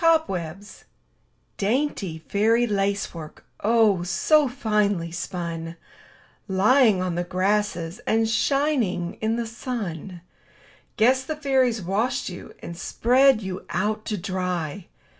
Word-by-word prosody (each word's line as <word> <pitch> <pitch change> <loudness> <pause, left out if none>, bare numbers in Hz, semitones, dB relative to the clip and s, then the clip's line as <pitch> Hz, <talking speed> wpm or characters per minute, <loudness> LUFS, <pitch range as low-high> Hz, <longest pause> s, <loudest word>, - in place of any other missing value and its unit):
COBWEBS 205 - 0 0.7
Dainty 205 - -1
fairy 225 +4 +3
lace 200 -2 -1
work, 160 -3 -10 0.2
so 220 - +3
finely 210 -8 0
spun, 170 -2 -5 0.7
Lying 210 +1 +4
on 180 -1 -1
the 175 +1 -1
grasses 185 -1 -1
and 225 0 +2
shining 225 - +1
in 220 +1 +1
the 235 0 -2
sun, 205 - -5 0.8
Guess 260 +4 +3
the 310 - -3
fairies 260 -7 +1
washed 205 +8 -1
you - - -10
and 170 - -6
spread 250 +6 +3
you 190 -1 -5
out 215 +2 -1
to 215 - -2
dry. 180 -2 -3
205 Hz, 110 wpm, -24 LUFS, 180-240 Hz, 0.8 s, Lying